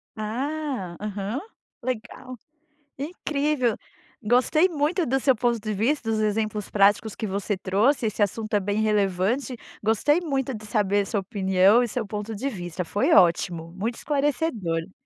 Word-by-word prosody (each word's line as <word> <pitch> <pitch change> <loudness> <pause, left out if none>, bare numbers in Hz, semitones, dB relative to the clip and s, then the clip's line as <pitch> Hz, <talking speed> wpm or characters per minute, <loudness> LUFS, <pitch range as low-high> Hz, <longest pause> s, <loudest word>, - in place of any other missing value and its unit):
Ah, 250 - -3
aham, 210 +4 -3 0.4
legal, 255 +1 -5 0.6
incrível, 290 -5 -1 0.5
gostei 255 - +3
muito 325 +2 0
do 265 +2 +1
seu 265 -3 +3
ponto 240 0 +1
de 215 0 -3
vista, 230 +2 0
dos 215 -1 0
exemplos 215 -1 -1
práticos 205 +1 +3
que 220 - -4
você 200 +1 -2
trouxe, 220 +7 +2
esse 210 0 -1
assunto 215 +2 -1
é 205 - +4
bem 205 +2 -1
relevante, 210 +5 +1 0.3
gostei 260 - +2
muito 270 -6 -2
de 215 0 -8
saber 205 -2 +1
sua 205 - -1
opinião 195 +2 +3
e 240 - -1
seu 225 -1 -3
ponto 210 +2 -5
de 265 +7 -2
vista, 180 -5 -5
foi 205 +5 +1
ótimo, 170 -2 +3
muito 220 +6 -3
esclarecedor. 245 - -1
215 Hz, 145 wpm, -25 LUFS, 200-260 Hz, 0.6 s, é